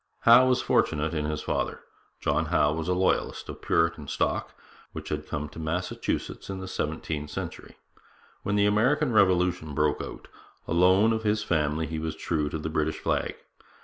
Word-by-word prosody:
Howe 120 +2 +7
was 130 0 +2
fortunate 80 +1 +1
in 75 -2 -1
his 75 0 -3
father. - - -2 0.4
John - - +1
Howe 75 +1 +2
was 80 +1 -3
a 90 - +1
Loyalist, 95 0 0
of - - -8
Puritan 85 -3 +1
stock - - -1 0.4
which - - -7
had 75 0 -3
come 75 0 -3
to 80 - -11
Massachusetts 85 +5 -3
in 95 -1 -4
the 95 - -6
seventeenth 75 -3 -3
century. - - -7 0.6
When 100 - -1
the 100 0 +4
American 125 +8 +2
Revolution 90 -6 +2
broke 75 +1 +1
out, - - -8 0.4
alone 95 +6 +4
of 110 - -1
his 105 -1 +1
family 80 -3 0
he 80 +1 -4
was 80 0 -3
true 80 -2 -1
to 80 - -3
the 80 - -4
British 80 0 -1
flag. - - -1
80 Hz, 175 wpm, -27 LUFS, 75-100 Hz, 0.6 s, Howe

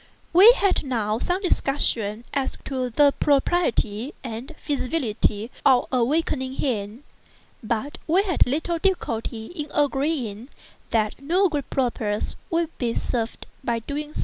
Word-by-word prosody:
We 390 +7 +10
had 400 -6 +1
now 225 -5 -1
some 360 +8 -1
discussion 235 - +1
as 275 -2 -1
to 255 -2 -2
the 285 +4 +4
propriety 275 -5 +1
and 235 0 -6
feasibility 245 -6 -1
of 260 -3 +5
awakening 260 +1 0
him; 230 -2 -2 0.6
but 235 +5 -3
we 360 +5 +4
had 360 -10 +2
little 320 +5 -1
difficulty 230 - -1
in 300 -4 -5
agreeing 270 -6 0 0.4
that 215 +2 0
no 360 +7 +2
good 290 -4 -3
purpose 230 -5 -1
would 335 -1 -1
be 235 -2 -1
served 230 -2 -3 0.2
by 235 -2 0
so 225 - -7
doing. 300 +1 -5
265 Hz, 130 wpm, -24 LUFS, 230-305 Hz, 0.6 s, We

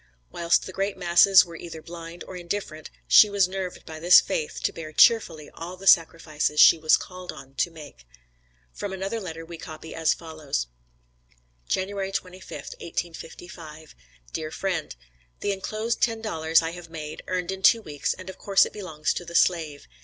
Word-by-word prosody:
Whilst 170 0 +1
the - - -7
great 195 +1 -2
masses 180 +1 +6
were 170 -1 -11
either 165 -1 -8
blind, 170 +1 -9
or 185 - -10
indifferent, 170 -3 -5 0.2
she 210 - +8
was 200 -2 +2
nerved 185 -1 -6
by 160 -1 -8
this 175 +2 +8
faith 155 - -3
to - - 0
bear 155 -2 -8
cheerfully 160 -5 +3
all 175 +2 -8
the 195 - -11
sacrifices 160 -4 +3
she 165 - +8
was 155 0 +4
called 180 -1 -8
on 135 -3 -13
to - - +1
make. 150 - -13 0.7
From 200 -2 -5
another 195 +4 -3
letter 165 -5 -7
we 165 0 -10
copy 160 0 -9
as 160 -1 +1
follows: 155 - -4 1.0
JANUARY 195 0 -2
25th, 185 0 -6
1855. 165 -2 -8 0.4
DEAR 155 -1 -3
FRIEND: 175 - -3 0.5
The 205 - 0
enclosed 215 +4 -3
ten 225 -2 +1
dollars 165 -6 +1
I 165 - -2
have 175 -1 -10
made, 155 -2 -7
earned 180 0 -2
in 190 0 -6
two 225 +3 +5
weeks, 145 -5 -3
and 185 - -11
of 190 - -9
course 195 -1 +4
it - - -9
belongs 155 -8 -3
to - - -5
the 170 0 -10
slave. 160 -6 +1
170 Hz, 175 wpm, -25 LUFS, 160-190 Hz, 1.0 s, she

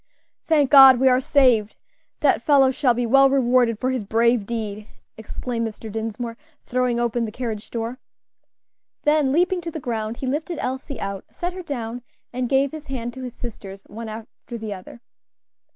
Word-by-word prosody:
"Thank 295 -4 +3
God, 270 -3 +9
we 265 0 +5
are 255 0 +3
saved! 250 -7 +3 0.5
That - - +3
fellow 275 -3 +4
shall 255 -2 +2
be 245 0 -1
well 275 +3 +5
rewarded 250 -3 +2
for 255 +3 -1
his 255 -4 -2
brave 230 0 +2
deed," 215 -2 -4 0.3
exclaimed 230 +1 -4
Mr. 220 0 -8
Dinsmore, 225 +2 -4 0.3
throwing 250 -1 0
open 240 0 0
the 215 - -6
carriage 225 -3 -5
door. 235 +2 -4 1.0
Then, 295 -2 +3
leaping 355 +4 +2
to 340 - -5
the 320 - -6
ground, 225 -3 -3
he - - -5
lifted 310 +6 -2
Elsie 260 +1 -4
out, 195 -1 -5
set 350 0 -4
her 370 - -7
down, 245 -7 -5 0.3
and 250 -1 -2
gave 270 0 +2
his 310 -1 -8
hand 240 -4 -5
to 260 - -9
his 250 -2 -7
sisters 200 -4 -9
one 225 +1 -8
after 225 +2 -9
the 215 -2 -5
other. 190 +4 -12
245 Hz, 175 wpm, -22 LUFS, 225-270 Hz, 1.0 s, God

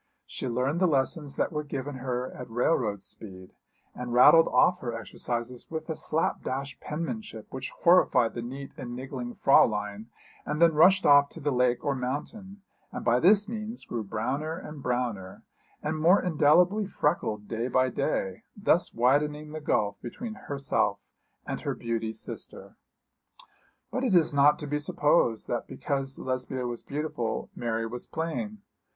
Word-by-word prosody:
She - - -5
learned 130 +6 0
the 185 - +4
lessons 140 0 0
that - - 0
were 150 -1 -2
given 140 -1 -5
her 125 0 -3
at 125 - -9
railroad 115 -4 0
speed, 95 -2 -9 0.4
and 125 -1 -6
rattled 130 +7 +7
off 180 0 +3
her 120 -2 -4
exercises 120 +2 -5
with 160 -1 -5
a - - -2
slap 155 +1 -1
dash 135 +1 -4
penmanship 165 - -5
which 130 0 -5
horrified 170 -9 +4
the 120 - -4
neat 135 +4 -7
and 125 -4 -6
niggling 125 -1 -6
Fräulein, 105 -4 +3 0.4
and 150 +1 -3
then 170 -1 +6
rushed 185 +5 +5
off 145 0 +6
to - - -11
the 145 +1 -1
lake 125 +1 +1
or 140 - +2
mountain, 190 - -5 0.3
and - - -6
by 120 +1 +4
this 205 +5 +5
means 225 +1 -5
grew 115 -2 -4
browner 135 +10 -3
and 150 -5 -9
browner, 120 -7 -3 0.4
and 155 +1 -2
more 175 +5 +6
indelibly 180 +5 +3
freckled 105 - -1
day 115 +3 -2
by 130 +1 +2
day, 95 -5 -2 0.2
thus 190 -4 +2
widening 150 +5 +1
the 155 0 -6
gulf 105 -8 0
between 220 - -6
herself 140 -8 -1 0.5
and - - -4
her - - -2
beauty 115 -1 -2
sister. 110 - -7 1.2
But 260 - -2
it 235 -8 +2
is 165 -3 +4
not 145 +1 +5
to 150 - -6
be 150 +1 -1
supposed 145 -6 +2
that 120 - -2
because 135 -1 -2
Lesbia 130 0 -3
was 120 -1 -4
beautiful, 140 -6 -3
Mary 115 -1 -2
was 120 +2 -5
plain. 200 +6 -4
135 Hz, 160 wpm, -28 LUFS, 120-160 Hz, 1.2 s, rattled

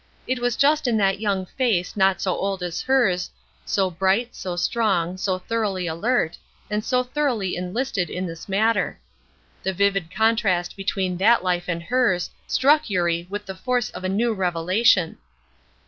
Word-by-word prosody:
It 255 -1 -1
was 245 -1 0
just 295 +1 +3
in 230 -2 +2
that 195 -1 +2
young 200 -3 -1
face 205 -5 -1
not 190 -1 +3
so 185 - 0
old 195 -2 -2
as 175 -1 -3
hers, 215 -10 +2 0.4
so 190 -2 +1
bright, 195 +7 +1
so 180 -2 -4
strong, 180 -2 0
so 185 0 -1
thoroughly 195 -2 -2
alert, 170 +2 0 0.3
and 210 0 -1
so 250 +1 +1
thoroughly 250 -8 -1
enlisted 180 0 -2
in 185 +1 -3
this 165 +2 -8
matter. 220 +4 +1 0.6
The 190 - -1
vivid 195 -2 +1
contrast 205 -4 +1
between 190 -2 -2
that 215 +2 +4
life 175 -1 0
and 170 -1 -2
hers 230 -5 +1 0.2
struck 295 +2 +3
Eurie 175 -2 0
with 205 +1 -5
the 190 - -6
force 245 +4 -1
of - - -8
a 185 - -1
new 225 +4 +1
revelation. 180 0 +2
195 Hz, 165 wpm, -23 LUFS, 180-230 Hz, 0.6 s, that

